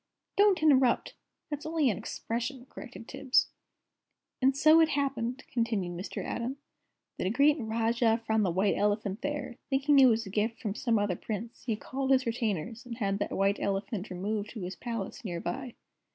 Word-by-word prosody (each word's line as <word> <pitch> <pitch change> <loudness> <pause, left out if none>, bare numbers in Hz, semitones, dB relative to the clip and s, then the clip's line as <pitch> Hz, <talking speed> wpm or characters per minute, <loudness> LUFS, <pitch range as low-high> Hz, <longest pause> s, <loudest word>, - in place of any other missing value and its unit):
"Don't 400 -5 +4
interrupt! 265 -5 +4 0.4
That's 295 0 -3
only 315 -2 +1
an 195 - -4
expression," 245 +3 -4
corrected 240 -5 -10
Tibbs. 265 -1 +2 0.9
"And 265 +1 +4
it - - -6
so 310 +2 +7
happened," 275 -4 -1
continued 225 -7 0
Mr. 180 +4 -5
Atom, 245 +4 -3 0.6
"that - - 0
a - - +2
great 285 +7 +4
Rajah 230 0 +1
found 220 -1 +2
the 190 - +2
White 190 +4 +2
Elephant 205 -1 0
there. 290 -4 -3
Thinking 280 +1 +4
it 265 - +9
was 225 -1 +2
a 195 - -8
gift 220 +3 -1
from 210 -3 -3
some 230 +1 +1
other 205 -3 0
Prince, 225 +5 -6
he 230 -3 0
called 265 +5 -4
his 265 -1 +4
retainers, 230 -1 -2
and 240 -2 -7
had 200 -3 -1
the 205 - 0
White 195 +1 +1
Elephant 200 +1 -2
removed 205 +3 -3
to 220 - -6
his 180 +1 -5
palace, 230 +1 -5
near 175 -5 -3
by." 255 +5 -5
230 Hz, 180 wpm, -30 LUFS, 205-265 Hz, 0.9 s, it